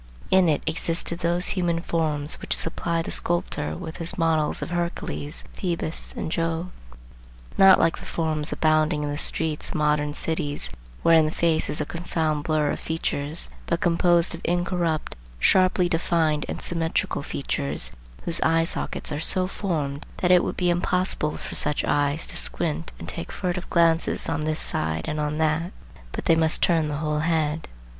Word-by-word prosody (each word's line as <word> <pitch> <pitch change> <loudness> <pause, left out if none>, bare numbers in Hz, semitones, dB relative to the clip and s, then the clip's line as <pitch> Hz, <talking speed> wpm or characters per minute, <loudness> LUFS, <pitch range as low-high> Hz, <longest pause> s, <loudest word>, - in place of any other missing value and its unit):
In 185 -2 +5
it 150 - +1
existed 165 +1 -1
those 175 +1 +1
human 175 -3 0
forms 155 -3 -1
which - - 0
supplied 165 0 -1
the - - -4
sculptor 175 0 0
with 165 -2 -7
his 170 +3 0
models 160 -3 +1
of - - -6
Hercules, 170 -3 -2
Phœbus, 170 -3 -3
and - - -3
Jove; 165 +2 -1 0.8
not 195 -1 +7
like 165 - +2
the - - -10
forms 155 -2 -1
abounding 155 -1 +2
in 145 - -2
the 145 - -3
streets 160 -2 0
of - - -6
modern 150 -1 +1
cities, 145 -3 -2 0.3
wherein 165 -1 +6
the - - -2
face 165 -1 +1
is - - -1
a 150 - -1
confused 160 -3 -2
blur 155 -2 +1
of - - -3
features, 160 -1 -2 0.2
but 170 - 0
composed 175 -1 +3
of 170 - -7
incorrupt, 175 -2 -1 0.2
sharply 185 - +4
defined 165 -3 +1
and - - -4
symmetrical 165 -1 -1
features, 70 -3 -2 0.3
whose 165 - +5
eye 165 +1 +3
sockets 165 - -3
are 145 - -2
so 185 +3 +1
formed 155 -7 -3
that 180 - +2
it 180 -1 +6
would - - -3
be 180 -1 +2
impossible 175 -3 0
for - - -7
such 150 - +1
eyes 145 +2 +1
to - - -7
squint 165 0 -1
and - - -9
take 170 - -3
furtive 180 -1 -3
glances 165 -1 +2
on 155 -1 -1
this 155 0 -1
side 80 +1 -1
and 155 - -2
on 150 0 -1
that, 160 +3 0 0.4
but - - -5
they 165 - +5
must 160 0 +2
turn 165 -3 +2
the 150 - -3
whole 150 0 -1
head. 160 -1 0
165 Hz, 170 wpm, -25 LUFS, 150-170 Hz, 0.8 s, not